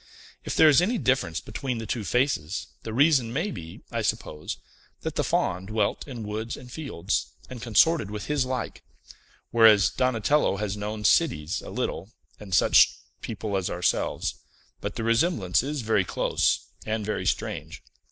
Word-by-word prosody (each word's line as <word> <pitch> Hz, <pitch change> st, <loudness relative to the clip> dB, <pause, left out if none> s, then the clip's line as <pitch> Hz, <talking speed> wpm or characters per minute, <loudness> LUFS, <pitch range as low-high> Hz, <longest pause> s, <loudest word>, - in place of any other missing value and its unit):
"If -, -, -3 dB
there 160 Hz, -, +7 dB
is 150 Hz, +2 st, +6 dB
any 225 Hz, +7 st, +1 dB
difference 125 Hz, -, +1 dB
between 125 Hz, -, -4 dB
the 115 Hz, -, -5 dB
two 110 Hz, +1 st, -2 dB
faces, 105 Hz, -, 0 dB, 0.2 s
the 110 Hz, -, -6 dB
reason 135 Hz, -1 st, +3 dB
may 165 Hz, -, -1 dB
be, 80 Hz, -, -9 dB
I -, -, -1 dB
suppose, 75 Hz, 0 st, -3 dB, 0.4 s
that -, -, -3 dB
the -, -, 0 dB
Faun 95 Hz, +2 st, 0 dB
dwelt 105 Hz, +3 st, -1 dB
in 120 Hz, -5 st, -6 dB
woods 110 Hz, +2 st, -4 dB
and 125 Hz, -1 st, -12 dB
fields, 120 Hz, -, -2 dB, 0.2 s
and 125 Hz, -2 st, -7 dB
consorted 120 Hz, -, +3 dB
with 105 Hz, 0 st, -5 dB
his 150 Hz, -2 st, +1 dB
like; 130 Hz, 0 st, -4 dB, 0.7 s
whereas 110 Hz, -4 st, +6 dB
Donatello 130 Hz, -1 st, +1 dB
has 105 Hz, -1 st, -2 dB
known 105 Hz, +1 st, -5 dB
cities 80 Hz, -, +2 dB
a -, -, -9 dB
little, 95 Hz, +6 st, -3 dB, 0.3 s
and 105 Hz, -2 st, -10 dB
such -, -, +6 dB, 0.3 s
people 105 Hz, -2 st, -4 dB
as 95 Hz, -2 st, -1 dB
ourselves. 90 Hz, 0 st, 0 dB, 0.5 s
But -, -, -5 dB
the 115 Hz, -, -3 dB
resemblance 115 Hz, -, +2 dB
is 145 Hz, +2 st, -3 dB
very 110 Hz, -4 st, +2 dB
close, -, -, +1 dB, 0.2 s
and 110 Hz, -1 st, -2 dB
very 105 Hz, -, -2 dB
strange." -, -, -3 dB
110 Hz, 160 wpm, -26 LUFS, 100-130 Hz, 0.7 s, there